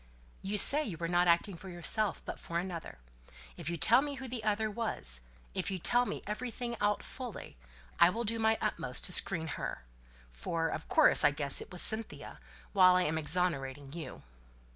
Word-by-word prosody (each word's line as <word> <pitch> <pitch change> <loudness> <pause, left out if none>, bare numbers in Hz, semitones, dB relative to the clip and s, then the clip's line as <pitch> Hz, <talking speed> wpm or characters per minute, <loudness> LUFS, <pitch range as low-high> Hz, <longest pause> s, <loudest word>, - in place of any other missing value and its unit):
"You 200 +2 -2
say 290 +9 +6
you 195 - -6
were 170 - -3
not 175 +1 +2
acting 175 +3 +2
for 190 +3 -11
yourself, 180 +3 +1
but - - -6
for 170 - -5
another. 175 -2 -5 0.6
If 150 - -6
you 170 - -3
tell 235 - +5
me 285 0 -4
who 265 -1 -7
the 240 -2 -5
other 215 0 0
was, 205 - -2 0.3
if - - -3
you 190 - -3
tell 245 +7 +1
me - - -5
everything 235 +2 -5
out 205 0 0
fully, 250 -4 -8 0.4
I 170 - +7
will 230 +6 -3
do 230 +1 -2
my 220 0 +2
utmost 165 - -2
to 180 - +3
screen 165 -3 +3 0.2
her - - -5 0.5
for 165 - -3
of - - -6
course 320 -5 +4
I - - +6
guess 140 -1 +2
it - - -11
was 180 - +3
Cynthia 220 0 -1 0.3
while 185 -2 +6
I 180 - +3
am 160 0 -1
exonerating 145 -4 -1
you." 170 -1 -8
185 Hz, 190 wpm, -31 LUFS, 165-225 Hz, 0.6 s, I